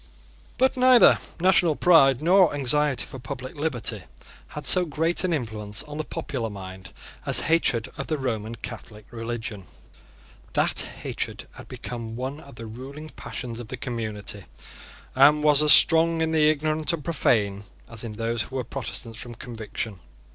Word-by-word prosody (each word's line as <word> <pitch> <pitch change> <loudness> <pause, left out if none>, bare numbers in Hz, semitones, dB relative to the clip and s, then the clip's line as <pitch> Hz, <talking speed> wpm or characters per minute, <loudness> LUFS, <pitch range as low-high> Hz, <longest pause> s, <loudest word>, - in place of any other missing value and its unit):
But 260 +1 +2
neither 255 -1 +6 0.2
national 175 -3 +3
pride 140 -6 +4
nor 180 -2 +4
anxiety 145 0 0
for 130 - -10
public 130 0 -8
liberty 145 -6 -2 0.5
had 150 -1 -8
so 180 - +5
great 165 +2 -1
an 185 - 0
influence 110 -8 -3
on 150 +1 -9
the - - -1
popular 120 -6 -5
mind 95 -3 -10 0.3
as - - +4
hatred 145 -8 +1
of - - -4
the 155 - -1
Roman 115 -4 -4
Catholic 110 -2 -10
religion. 115 -4 -6 0.9
That - - 0
hatred - - -5
had - - -13
become 115 -2 -7
one 130 +4 -5
of 140 -4 -15
the 115 - -9
ruling 135 +7 -10
passions 120 -5 -8
of 120 - -8
the 130 - -7
community, 110 -5 -5 0.7
and 145 +3 +4
was 150 -1 +4
as 150 -1 +6
strong 165 0 +8
in 160 0 0
the 155 -1 +3
ignorant 155 +1 0
and 155 -4 -4
profane 105 -10 0 0.2
as 115 0 -7
in 115 -2 -6
those 115 +1 -2
who 130 - -6
were 130 - -2
Protestants 115 -3 -5
from 120 -1 -7
conviction. 110 -4 -6
130 Hz, 160 wpm, -24 LUFS, 115-155 Hz, 0.9 s, strong